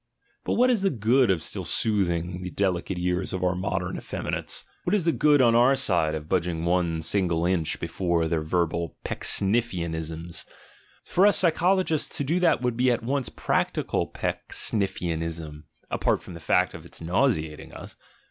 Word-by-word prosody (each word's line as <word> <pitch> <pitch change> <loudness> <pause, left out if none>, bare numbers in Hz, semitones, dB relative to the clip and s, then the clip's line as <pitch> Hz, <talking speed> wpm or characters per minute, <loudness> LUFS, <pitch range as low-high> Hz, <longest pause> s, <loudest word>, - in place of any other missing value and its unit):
But - - -1
what 250 +2 +4
is 230 -5 +1
the 195 - +3
good 120 - +2
of 85 -4 +1
still - - -4
soothing 90 -4 0
the 90 - -4
delicate 95 -1 -1
ears 90 +1 -1
of 95 -1 -3
our 90 0 +2
modern 90 0 -2
effeminates? - - -3 0.2
What 180 - +1
is 190 -6 0
the 165 - +4
good 145 -4 +4
on 115 -1 +5
our 125 +4 +5
side 80 -10 +1
of 75 -1 -6
budging 85 -2 -1
one 85 -2 +1
single 85 -1 +1
inch 90 -3 0
before 85 -3 0
their 80 -1 0
verbal 85 0 -1
Pecksniffian 95 -5 0
ism? 80 +1 -5 0.8
For 190 +3 +4
us 205 - +4
psychologists 175 -1 +2
to - - -1
do 165 +6 0
that 175 -7 +2
would 125 -2 0
be 125 +1 +3
at 120 -2 0
once 135 +1 -1
practical - - -1
Pecksniffianism, 80 -6 -3 0.3
apart - - 0
from - - -10
the 85 - -8
fact - - +2
of - - -9
its - - -11
nau 90 +12 +2
seating 75 -8 -4
us. - - -10
90 Hz, 175 wpm, -26 LUFS, 85-125 Hz, 0.8 s, on